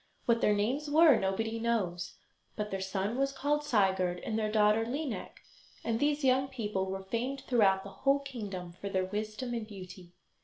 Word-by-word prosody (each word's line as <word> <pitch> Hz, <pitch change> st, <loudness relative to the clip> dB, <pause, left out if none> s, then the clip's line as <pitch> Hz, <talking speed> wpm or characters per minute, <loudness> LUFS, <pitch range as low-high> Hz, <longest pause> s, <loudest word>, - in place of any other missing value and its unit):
What 235 Hz, -1 st, +3 dB
their 210 Hz, -, +4 dB
names 260 Hz, +9 st, 0 dB
were 310 Hz, -1 st, +7 dB
nobody 220 Hz, +4 st, -1 dB
knows, 210 Hz, -7 st, -1 dB, 0.4 s
but 210 Hz, -1 st, -3 dB
their 195 Hz, 0 st, -2 dB
son 195 Hz, +5 st, -2 dB
was 275 Hz, 0 st, +2 dB
called 290 Hz, +2 st, 0 dB
Sigurd, 190 Hz, -8 st, +2 dB
and 220 Hz, -, -3 dB
their 215 Hz, -1 st, 0 dB
daughter 215 Hz, +1 st, +4 dB
Lineik, 265 Hz, +2 st, -4 dB, 0.4 s
and 225 Hz, -1 st, 0 dB
these 295 Hz, +1 st, +1 dB
young 265 Hz, 0 st, +3 dB
people 210 Hz, -7 st, -2 dB
were 190 Hz, 0 st, -4 dB
famed 245 Hz, +7 st, -3 dB
throughout 205 Hz, -8 st, +3 dB
the 200 Hz, -, -9 dB
whole 275 Hz, +1 st, +4 dB
kingdom 205 Hz, -11 st, -6 dB
for 190 Hz, +3 st, -7 dB
their 190 Hz, -1 st, 0 dB
wisdom 215 Hz, +5 st, -4 dB
and 230 Hz, -2 st, -3 dB
beauty. 185 Hz, -3 st, -10 dB
220 Hz, 180 wpm, -31 LUFS, 195-260 Hz, 0.4 s, were